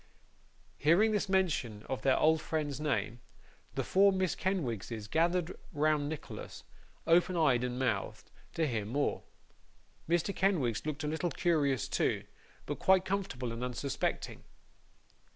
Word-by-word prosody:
Hearing 175 Hz, +9 st, +4 dB
this 210 Hz, -2 st, 0 dB
mention 155 Hz, -, 0 dB
of 130 Hz, -, -3 dB
their 135 Hz, -1 st, +3 dB
old 160 Hz, 0 st, +4 dB
friend's 150 Hz, -4 st, -2 dB
name, 120 Hz, -6 st, -1 dB, 0.6 s
the -, -, 0 dB
four 200 Hz, +1 st, +5 dB
Miss 185 Hz, -2 st, 0 dB
Kenwigses 120 Hz, -, -3 dB
gathered 170 Hz, +5 st, +1 dB, 0.2 s
round 150 Hz, -2 st, +1 dB
Nicholas, 155 Hz, -2 st, -7 dB, 0.4 s
open 175 Hz, +2 st, +3 dB
eyed 130 Hz, -7 st, +3 dB
and 125 Hz, 0 st, -2 dB
mouthed, 115 Hz, -7 st, -2 dB, 0.2 s
to 165 Hz, -, +1 dB
hear 115 Hz, -7 st, -1 dB
more. 140 Hz, +8 st, -1 dB, 0.9 s
Mr. 175 Hz, +3 st, +1 dB
Kenwigs 155 Hz, -, +1 dB
looked 155 Hz, 0 st, -3 dB
a -, -, -1 dB
little 160 Hz, +3 st, -1 dB
curious 145 Hz, -, +1 dB
too, -, -, 0 dB, 0.4 s
but -, -, -4 dB
quite 190 Hz, -1 st, +4 dB
comfortable 185 Hz, -12 st, -2 dB
and 115 Hz, +2 st, -5 dB
unsuspecting. 125 Hz, +2 st, -3 dB
155 Hz, 135 wpm, -32 LUFS, 125-175 Hz, 0.9 s, four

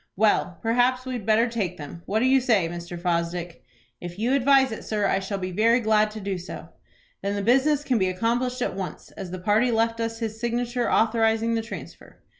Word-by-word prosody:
"Well, 190 Hz, -4 st, +2 dB
perhaps 245 Hz, +2 st, +2 dB
we 260 Hz, -, -4 dB
had 230 Hz, -4 st, -5 dB
better 220 Hz, +2 st, +4 dB
take 205 Hz, -7 st, -3 dB
them. 150 Hz, +3 st, -9 dB
What 215 Hz, +3 st, 0 dB
do -, -, +3 dB
you 265 Hz, 0 st, +4 dB
say, 220 Hz, -9 st, +2 dB
Mr. 175 Hz, 0 st, -7 dB
Fosdick?" 170 Hz, 0 st, -2 dB, 0.4 s
"If 175 Hz, 0 st, -8 dB
you 235 Hz, +5 st, 0 dB
advise 270 Hz, -1 st, +4 dB
it, 220 Hz, -, -6 dB
sir, 210 Hz, -2 st, -1 dB
I 195 Hz, -, +2 dB
shall 195 Hz, +1 st, -4 dB
be 185 Hz, -1 st, -4 dB
very 225 Hz, +6 st, +3 dB
glad 215 Hz, -2 st, +3 dB
to 215 Hz, +1 st, -8 dB
do 195 Hz, -2 st, -3 dB
so." 180 Hz, -, -9 dB, 0.5 s
"Then 200 Hz, +1 st, -2 dB
the 200 Hz, -, -2 dB
business 270 Hz, +6 st, +3 dB
can 255 Hz, -5 st, +1 dB
be 185 Hz, -1 st, +2 dB
accomplished 240 Hz, +6 st, -1 dB
at -, -, -2 dB
once, 190 Hz, -2 st, -6 dB
as 185 Hz, -, -8 dB
the 185 Hz, -, -5 dB
party 210 Hz, +6 st, +2 dB
left 230 Hz, 0 st, +1 dB
us 230 Hz, 0 st, -2 dB
his 220 Hz, -1 st, -4 dB
signature, 240 Hz, +1 st, -1 dB
authorizing 225 Hz, 0 st, +2 dB
the 225 Hz, -, 0 dB
transfer." 225 Hz, -, -10 dB
220 Hz, 215 wpm, -25 LUFS, 190-240 Hz, 0.5 s, better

